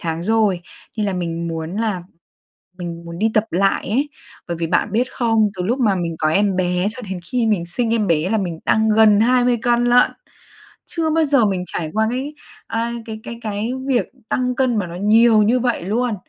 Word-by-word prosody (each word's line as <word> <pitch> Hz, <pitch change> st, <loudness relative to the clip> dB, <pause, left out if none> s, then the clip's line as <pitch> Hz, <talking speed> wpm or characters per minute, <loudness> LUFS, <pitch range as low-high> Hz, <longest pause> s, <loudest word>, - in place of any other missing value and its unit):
tháng 165 Hz, 0 st, -3 dB
rồi 210 Hz, -2 st, +2 dB, 0.4 s
nên 210 Hz, -2 st, 0 dB
là 195 Hz, -, -1 dB
mình 170 Hz, -2 st, -3 dB
muốn 165 Hz, +3 st, -4 dB
là 215 Hz, -5 st, -1 dB, 0.8 s
mình 170 Hz, -1 st, -6 dB
muốn 170 Hz, 0 st, -8 dB
đi 220 Hz, +2 st, +2 dB
tập 215 Hz, 0 st, +3 dB
lại 195 Hz, +3 st, +1 dB
ấy. 270 Hz, +8 st, 0 dB, 0.4 s
Bởi 170 Hz, -, -2 dB
vì 165 Hz, 0 st, -2 dB
bạn 175 Hz, +4 st, 0 dB
biết 245 Hz, +3 st, 0 dB
không, 225 Hz, -3 st, +2 dB
từ 180 Hz, -, -4 dB
lúc 235 Hz, +8 st, 0 dB
mà 210 Hz, -5 st, +3 dB
mình 170 Hz, -2 st, -3 dB
có 155 Hz, -, +1 dB
em 195 Hz, +2 st, +2 dB
bé 180 Hz, +1 st, 0 dB
cho 250 Hz, +3 st, -9 dB
đến 190 Hz, -4 st, -5 dB
khi 245 Hz, -2 st, +1 dB
mình 200 Hz, -6 st, +1 dB
sinh 230 Hz, +6 st, -1 dB
em 215 Hz, -3 st, +1 dB
bé 165 Hz, -1 st, +1 dB
là 220 Hz, -, +2 dB
mình 175 Hz, -5 st, -4 dB
tăng 220 Hz, 0 st, +2 dB
gần 215 Hz, -1 st, +5 dB
20 245 Hz, +1 st, +3 dB
cân 240 Hz, 0 st, +2 dB
lận. 245 Hz, +1 st, +5 dB, 0.7 s
Chưa 325 Hz, -2 st, -2 dB
bao 320 Hz, +1 st, +2 dB
giờ 275 Hz, -6 st, +3 dB
mình 190 Hz, -3 st, -1 dB
trải 160 Hz, -3 st, -4 dB
qua 220 Hz, 0 st, +2 dB
cái, 265 Hz, +5 st, -4 dB, 0.3 s
à, 230 Hz, +1 st, -2 dB
cái 220 Hz, -1 st, -7 dB
cái 235 Hz, -, -8 dB
cái 215 Hz, +2 st, -3 dB
việc 255 Hz, -3 st, +1 dB, 0.2 s
tăng 250 Hz, 0 st, 0 dB
cân 255 Hz, -3 st, +1 dB
mà 195 Hz, -4 st, -1 dB
nó 170 Hz, -, -8 dB
nhiều 215 Hz, +3 st, +5 dB
như 235 Hz, +4 st, +2 dB
vậy 240 Hz, -5 st, 0 dB
luôn. 230 Hz, +4 st, 0 dB
215 Hz, 215 wpm, -20 LUFS, 180-240 Hz, 0.8 s, gần